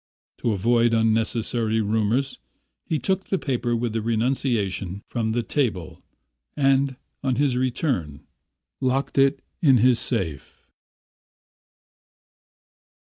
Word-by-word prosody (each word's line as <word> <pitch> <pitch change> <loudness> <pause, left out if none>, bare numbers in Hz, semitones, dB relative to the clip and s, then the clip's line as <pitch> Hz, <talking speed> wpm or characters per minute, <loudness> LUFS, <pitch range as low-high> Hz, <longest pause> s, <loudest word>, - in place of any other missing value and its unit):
To 115 - 0
avoid 115 +3 +2
unnecessary 115 0 +1
rumours 110 - 0 0.5
he 160 - 0
took 190 +5 -1
the 195 - 0
paper 120 -6 -1
with 115 -1 -2
the 115 - -1
renunciation 110 -5 -1
from 115 -2 -1
the 115 +2 0
table 110 - -2 0.6
and, 135 -1 +2 0.3
on 130 -2 +1
his 140 -1 +1
return, 125 - -2 0.5
locked 135 +1 0
it 135 0 +3 0.2
in 135 -7 +6
his 120 +1 +4
safe. 90 - -3
120 Hz, 105 wpm, -24 LUFS, 110-135 Hz, 0.6 s, in